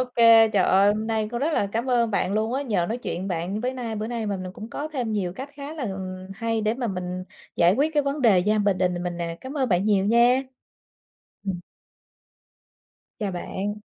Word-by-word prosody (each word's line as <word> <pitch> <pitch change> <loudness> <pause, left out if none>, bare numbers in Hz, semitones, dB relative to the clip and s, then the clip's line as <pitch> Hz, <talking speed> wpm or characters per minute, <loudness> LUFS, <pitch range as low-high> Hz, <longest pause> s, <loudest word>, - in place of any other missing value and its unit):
kê, 230 -1 +7
trời 200 -3 +2
ơi, 195 +2 +4
hôm 215 +1 -3
nay 220 -1 0
có 240 - -2
rất 310 +3 0
là 200 - +1
cám 230 +5 -2
ơn 235 -2 +2
bạn 195 -1 0
luôn 220 +3 0
á, 270 - 0
nhờ 210 -10 0
nói 230 - -1
chuyện 190 -6 -4
bạn 180 +3 -2
với 255 +2 -2
nay 235 -4 -4
bữa 215 +1 -3
nay 235 -2 -3
mà 200 -2 -2
mình 185 0 -6
cũng 220 +1 -9
có 295 +5 -4
thêm 255 -7 -3
nhiều 190 -5 -1
cách 265 +8 -7
khá 285 +2 -7
là, 305 - -5
ừm, 185 -3 -5
hay 225 +2 -1
để 215 +1 +1
mà 245 -1 -3
mình 180 -1 -4 0.3
giải 175 +2 +5
quyết 295 +6 +1
cái 295 -2 +2
vấn 280 +1 -2
đề 215 -7 +5
gia 210 +4 +2
bình 200 -2 +2
đình 180 -1 0
mình 175 -1 -3
nè, 170 -1 -4
cám 265 +3 -6
ơn 260 -3 +1
bạn 180 +1 +2
nhiều 200 -2 +3
nha! 240 +4 +4 1.0
Ừm. 185 -3 -2 1.6
Chào 205 -3 -2
bạn. 195 +3 -3
215 Hz, 230 wpm, -25 LUFS, 190-245 Hz, 1.6 s, kê